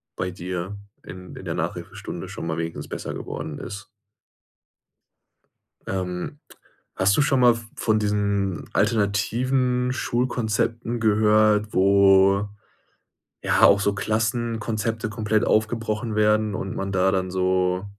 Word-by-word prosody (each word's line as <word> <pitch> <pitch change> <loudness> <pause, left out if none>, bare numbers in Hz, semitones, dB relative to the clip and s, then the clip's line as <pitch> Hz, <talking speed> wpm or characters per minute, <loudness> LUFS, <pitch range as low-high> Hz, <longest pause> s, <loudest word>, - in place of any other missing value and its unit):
bei 90 - -2
dir 90 +2 -5 0.3
in 90 +1 -10
in - - -10
der - - -2
Nachhilfestunde - - -5
schon - - -6
mal 80 - -2
wenigstens 80 0 -4
besser - - -5
geworden 75 -2 -6
ist. 105 +3 -7 2.0
Ähm, 90 +8 -4 0.6
hast 95 +1 +3
du - - +4
schon 135 -1 +2
mal 120 -2 +6
v 115 0 -9
von 110 -1 +1
diesen 100 -3 -1
alternativen 120 +5 +1
Schulkonzepten 120 -1 -1
gehört, 105 0 +3
wo, 100 +1 +5 1.0
ja, - - +2
auch 100 - +7
so 100 0 +1
Klassenkonzepte 115 0 -1
komplett 110 -1 0
aufgebrochen 110 0 0
werden 105 0 +2
und 95 0 -4
man 95 0 -3
da 95 0 +2
dann 95 -1 -1
so 95 0 0
105 Hz, 120 wpm, -24 LUFS, 95-115 Hz, 2.0 s, auch